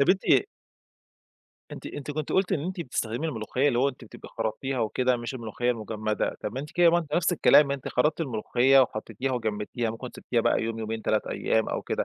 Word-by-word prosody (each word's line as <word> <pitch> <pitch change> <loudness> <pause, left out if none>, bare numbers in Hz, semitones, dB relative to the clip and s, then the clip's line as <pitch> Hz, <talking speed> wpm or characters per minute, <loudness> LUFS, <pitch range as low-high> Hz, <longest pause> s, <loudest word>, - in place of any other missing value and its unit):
طب 155 +6 +5
أنتِ 190 0 +2 1.5
أنتِ، - - -8
أنتِ 145 0 -6
كنتِ 150 0 -3
قلتِ 190 0 +2
إن 155 - +1
أنتِ 185 0 -4
بتستخدمي 125 0 -2
الملوخيّة 130 +1 0
اللي 120 -3 +1
هو 135 +2 +3
أنتِ 125 -3 -9
بتبقى - - -12
خَرَطتيها 120 +4 -2
وكده، 125 +3 +1
مش 120 +2 -5
الملوخيّة 120 +1 -2
المجمّدة، 110 -1 -2
طب 110 +4 -4
أنتِ 145 +2 -5
كده 175 -1 +5
ما 170 - +3
أنتِ 155 -3 -4
نفس 175 +1 +2
الكلام، 150 -3 +5
أنتِ 140 -2 -3
خرطّتي 150 +6 +1
الملوخيّة 130 +1 +3
وحطّيتيها 125 +2 -2
وجمّدتيها، 110 0 -2
ممكن 120 +3 -7
سبتيها 120 -2 0
بقى - - +2
يوم 115 0 -3
يومين 110 0 -4
3 110 - 0
أيّام 110 0 0
أو - - -3
كده، - - -2
125 Hz, 200 wpm, -27 LUFS, 110-145 Hz, 1.5 s, طب